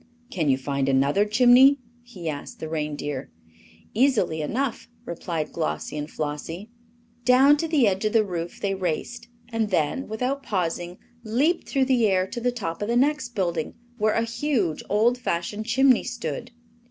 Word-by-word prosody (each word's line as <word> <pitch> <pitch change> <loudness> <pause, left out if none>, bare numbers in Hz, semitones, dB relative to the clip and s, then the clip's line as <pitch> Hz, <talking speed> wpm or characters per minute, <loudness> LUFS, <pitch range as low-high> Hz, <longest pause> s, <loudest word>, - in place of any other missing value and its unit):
"Can 160 -5 0
you 130 - +4
find 140 0 -1
another 140 +9 +3
chimney?" 250 +5 +6 0.2
he 220 -9 -9
asked 145 -2 -5
the 160 - -5
reindeer. 150 - -4 0.6
"Easily 225 - +2
enough," 240 - -2 0.2
replied 165 -3 -4
Glossie 75 - -3
and 150 0 -4
Flossie. 165 +8 -5 0.5
Down 260 +4 +6
to 325 - -2
the 295 -8 +3
edge 190 0 0
of 215 - 0
the 220 -2 +4
roof 175 -3 -5
they 195 -1 -1
raced, 185 +5 -3 0.2
and 225 -2 -1
then, 180 - 0
without 250 +6 -2
pausing, 175 -5 -2 0.3
leaped 275 +10 0
through 270 -2 +2
the 250 -4 +3
air 185 -2 +2
to 215 - -6
the 245 +1 +1
top 195 -9 -5
of 205 - -1
the 235 +1 +1
next 280 -2 +1
building, 170 -5 -1 0.2
where 215 0 +2
a 230 - +2
huge, 230 - -1
old 230 +5 +3
fashioned 210 0 -3
chimney 260 +1 +4
stood. 240 0 -5
210 Hz, 165 wpm, -25 LUFS, 165-245 Hz, 0.6 s, chimney